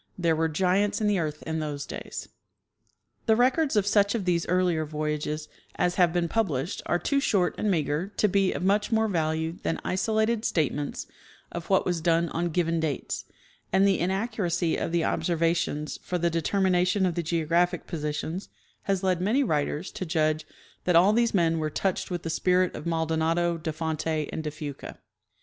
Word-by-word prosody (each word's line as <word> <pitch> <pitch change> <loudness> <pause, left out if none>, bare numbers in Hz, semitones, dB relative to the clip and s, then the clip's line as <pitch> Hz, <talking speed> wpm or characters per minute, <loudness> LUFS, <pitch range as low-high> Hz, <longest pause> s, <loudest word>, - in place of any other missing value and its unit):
" - - -20
Tliere 165 -2 +2
were 160 +1 +1
giants 190 +5 +1
in 215 - 0
the 205 -2 +2
earth 155 -2 -3
in 160 0 -2
those 145 -2 -4
days." - - -7 1.0
The 220 - +5
records 260 +4 +2
of 205 -2 +3
such 205 +1 +3
of 210 -5 -2
these 170 -2 +1
earlier 180 -3 +2
voyages 150 0 -3 0.3
as 180 0 +1
have 175 -2 +3
been 175 0 0
pub 225 +4 +1
lished 140 +3 -3
are 175 - +2
too 280 +10 +1
short 195 -9 +2
and 215 - +1
meager 155 -1 0
to 210 - +4
be 195 -1 +2
of - - -4
much 205 +4 +2
more 220 0 +3
value 160 -2 -1
than 165 - -1
isolated 220 +3 +1
statements 145 - -1 0.5
of 170 -1 -6
what 190 - +3
was 175 -2 -1
done 165 0 +2
on 170 +2 -1
given 165 0 0
dates; 155 -4 -3 0.5
and 195 +1 +4
the 195 - +2
inaccuracy 185 -3 0
of - - -2
the 170 -1 +1
observations 165 -3 0
for 180 - -2
the 170 0 +1
determination 185 +3 +2
of 180 - +1
the 170 - -1
geo 165 0 -1
graphic 175 +2 +1
positions 155 +3 -4 0.4
has 195 -1 0
led 185 -2 +2
manj' 230 +9 +2
writers 150 +3 -1
to - - -5
judge 155 -2 0 0.4
that 180 - +3
all 185 +5 +6
these 235 -1 +2
men 165 -3 +2
were 155 -1 -1
touched 190 +4 -1
with 175 -2 -3
the 165 - -3
spirit 180 +2 +2
of - - -6
Maldonado, 165 +1 +1
de. 160 -1 -4
Fonte 160 0 -3 0.3
and 160 - -3
de 155 - -2
Fuca. 145 -2 -7
170 Hz, 190 wpm, -27 LUFS, 160-190 Hz, 1.0 s, all